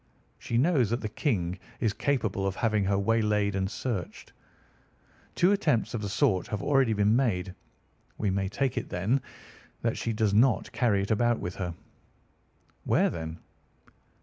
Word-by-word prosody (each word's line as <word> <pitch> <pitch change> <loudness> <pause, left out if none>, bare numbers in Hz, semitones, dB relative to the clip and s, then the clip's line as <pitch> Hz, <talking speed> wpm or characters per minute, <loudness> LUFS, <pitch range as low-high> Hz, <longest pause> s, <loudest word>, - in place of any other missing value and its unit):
She 115 - -2
knows 135 - +3
that 120 +2 -1
the 110 - -3
King 95 - -1 0.2
is 110 -3 +1
capable 110 -7 0
of 95 - -2
having 110 -3 +1
her 100 0 +1
waylaid 105 -1 +1
and 95 0 -1
searched. 105 -5 -5 1.0
Two 180 +3 +4
attempts 155 - +1
of 115 - -2
the 100 - -3
sort 100 -4 +1
have 105 -2 -4
already 135 -5 +3
been 105 +1 +3
made. 95 -8 0 0.6
We 105 -3 0
may 95 0 -1
take 135 +4 -1
it, - - -9
then, 105 +10 0 0.6
that 115 -1 0
she 115 - -1
does 110 -2 +1
not 115 -1 +3
carry 105 -6 +1
it 100 - -3
about 120 +2 +2
with 90 - -4
her." 90 -3 -3 1.1
"Where, - - +2
then?" 80 -1 -5
105 Hz, 160 wpm, -28 LUFS, 95-120 Hz, 1.1 s, Two